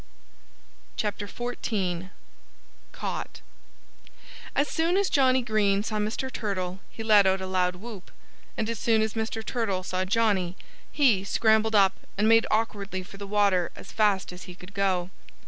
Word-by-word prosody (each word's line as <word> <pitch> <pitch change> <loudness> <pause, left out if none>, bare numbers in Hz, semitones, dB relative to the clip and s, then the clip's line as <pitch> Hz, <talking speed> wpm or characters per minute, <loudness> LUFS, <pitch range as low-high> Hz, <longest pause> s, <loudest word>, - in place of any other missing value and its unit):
XIV 205 -4 -3 0.8
CAUGHT! - - -5 1.1
As 285 +2 +2
soon 335 +3 +1
as 400 -1 +1
Johnnie 260 -3 +4
Green 205 -3 +2
saw 215 0 -2
Mr. 220 +5 -2
Turtle 190 -4 -3
he 225 - -8
let 210 -3 +6
out 190 0 +2
a 190 - -4
loud 180 -1 +1
whoop. 205 0 -9 0.5
And 220 - -1
as 230 -2 -3
soon 225 -2 +3
as 220 -1 -2
Mr. 220 0 -3
Turtle 205 -7 -1
saw 185 0 -1
Johnnie, 195 -3 +1 0.3
he 240 -10 +3
scrambled 220 +1 +2
up 195 -2 +5 0.2
and 210 +2 +3
made 225 0 +5
awkwardly 205 -4 -1
for 195 - -13
the 200 0 -7
water 200 -4 +2
as - - -11
fast 200 -4 +1
as 180 - -10
he 180 - -10
could 180 +2 -13
go. 190 -2 0
205 Hz, 150 wpm, -27 LUFS, 190-225 Hz, 1.1 s, let